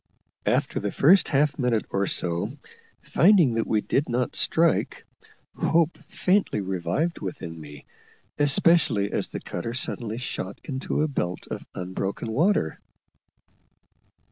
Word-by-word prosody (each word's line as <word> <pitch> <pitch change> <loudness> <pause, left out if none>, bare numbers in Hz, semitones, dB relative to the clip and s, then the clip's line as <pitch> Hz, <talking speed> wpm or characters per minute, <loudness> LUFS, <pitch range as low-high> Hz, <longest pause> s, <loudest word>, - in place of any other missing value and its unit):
After - - +1
the 100 0 -2
first 180 +7 +5
half 145 +1 +1
minute 120 -4 +1
or 100 0 0
so, 85 -1 -1 0.5
finding 175 - +4
that 115 0 -1
we 110 -1 +1
did 140 +5 0
not 125 +1 -1
strike, 165 0 +1 0.5
hope 165 0 +2
faintly 185 - +1
revived 95 - -2
within 85 -3 -6
me, 75 -1 -11 0.5
especially 140 - +3
as - - -1
the - - -6
cutter 115 +7 -5
suddenly 115 -3 -3
shot 100 -6 -5
into 135 +2 -2
a - - +1
belt 90 - -3
of - - -6
unbroken 95 +5 -4
water. 145 - +1
120 Hz, 125 wpm, -25 LUFS, 95-155 Hz, 0.5 s, first